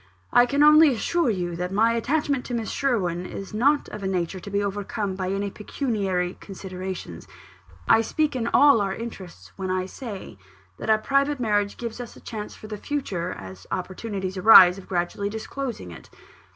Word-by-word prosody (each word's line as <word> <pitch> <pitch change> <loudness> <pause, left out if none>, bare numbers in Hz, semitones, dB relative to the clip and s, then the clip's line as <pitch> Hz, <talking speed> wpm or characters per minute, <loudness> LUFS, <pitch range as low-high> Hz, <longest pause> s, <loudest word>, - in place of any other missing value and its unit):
"I 245 0 +6
can 285 +3 +2
only 305 0 +7
assure 340 +5 0
you 175 -5 -2
that 180 +1 -3
my 225 +4 +3
attachment 275 +2 0
to 245 - -3
Miss 225 -2 -3
Sherwin 185 -10 0
is 195 +2 -8
not 280 +7 +2
of 210 - -7
a 195 - -2
nature 185 0 -2
to 190 - -9
be 200 0 0
overcome 200 0 -3
by 185 -1 -3
any 200 +1 -2
pecuniary 195 -6 -2
considerations. 185 - -7 0.6
I 225 - +6
speak 295 +5 -1
in 235 -2 -1
all 280 -3 +5
our 195 -1 -1
interests, 185 - -9
when 190 -1 -4
I 185 0 0
say 200 - -8 0.4
that - - -5
a 220 - +6
private 275 +5 +1
marriage 205 -3 0
gives 235 0 -5
us 240 - -9
a - - -13
chance 215 -2 -7
for - - -12
the 215 -1 -6
future, 205 -10 -3
as 95 -2 -11
opportunities 190 0 -4
arise 185 -2 +8
of 190 - -15
gradually 180 +3 -1
disclosing 220 - -5
it. 85 - -12
205 Hz, 180 wpm, -24 LUFS, 185-240 Hz, 0.6 s, arise